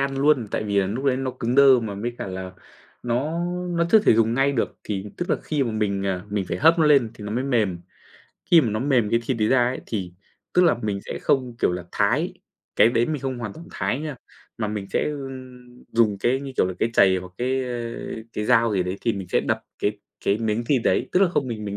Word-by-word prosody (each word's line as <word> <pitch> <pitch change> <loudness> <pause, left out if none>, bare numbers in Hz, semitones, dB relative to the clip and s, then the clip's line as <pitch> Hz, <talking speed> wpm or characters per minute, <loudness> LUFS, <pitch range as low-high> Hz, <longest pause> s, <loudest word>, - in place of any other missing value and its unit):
ăn 135 0 -1
luôn, 140 -5 +3
tại - - -2
vì 100 -1 0
là 95 - +2
lúc 115 +8 -4
đấy 135 -2 +2
nó 130 0 -2
cứng 120 0 -3
đơ 135 -2 +7
mà 110 -3 -4
với 115 +5 -3
cả - - -4
là 95 0 -6 0.5
nó 135 +8 -1 0.3
nó 170 0 +1
chưa 220 - +8
thể 205 - +4
dùng 115 +1 +2
ngay 135 +2 +2
được 120 - -2
thì 100 -2 -3
tức 175 - -3
là - - +3
khi 150 -3 -1
mà 120 - -1
mình, 100 -2 -1
à, 95 -1 -2
mình 100 -2 -1
phải - - -2
hấp 165 +2 +5
nó 155 - +4
lên 135 -7 +4
thì 105 - -10
nó 105 - -4
mới 125 +3 -1
mềm. 110 -10 +1 0.7
Khi 170 -2 +8
mà 115 -6 0
nó 110 - -1
mềm 125 -6 +2
cái 115 - +2
thịt 130 -2 0
đấy 110 0 +2
ra 130 -2 +4
ấy 125 +1 -2
thì 95 -6 -4 0.4
tức 180 - +5
là 170 - +5
mình 100 -2 -2
sẽ - - -5
không, 125 -4 0
kiểu - - +2
là, 90 -1 -4
thái, - - +1 0.4
cái - - +6
đấy 120 0 +1
mình 150 -4 -3
không 130 -2 -3
hoàn 115 -4 -5
toàn 165 +8 -12
thái 130 - -2
nha, 150 -3 -5 0.4
mà 110 - -1
mình 105 -2 -4
sẽ, - - +1
ưm, 130 -3 -9
dùng 110 -4 +2
cái, 125 +6 +1
như 140 -1 -7
kiểu - - +3
là, 95 - -4
cái 115 - +1
chày 95 -4 +5
hoặc 90 0 -7
cái, 130 +2 0
ơ, 120 -2 -4 0.4
cái 105 - -3
dao 115 -1 +3
gì 95 -2 +1
đấy 90 +2 -3
thì 115 - 0
mình 95 -3 -6
sẽ - - +2
đập - - -1 0.2
cái 105 0 -1 0.3
cái 100 +2 +2
miếng 110 +1 -1
thì 140 0 +3
đấy, 120 - +1
tức 180 - +3
là 195 - +5
không 145 -6 -1
mình 110 -2 -5
mình 100 -1 -4
120 Hz, 260 wpm, -23 LUFS, 105-135 Hz, 0.7 s, chưa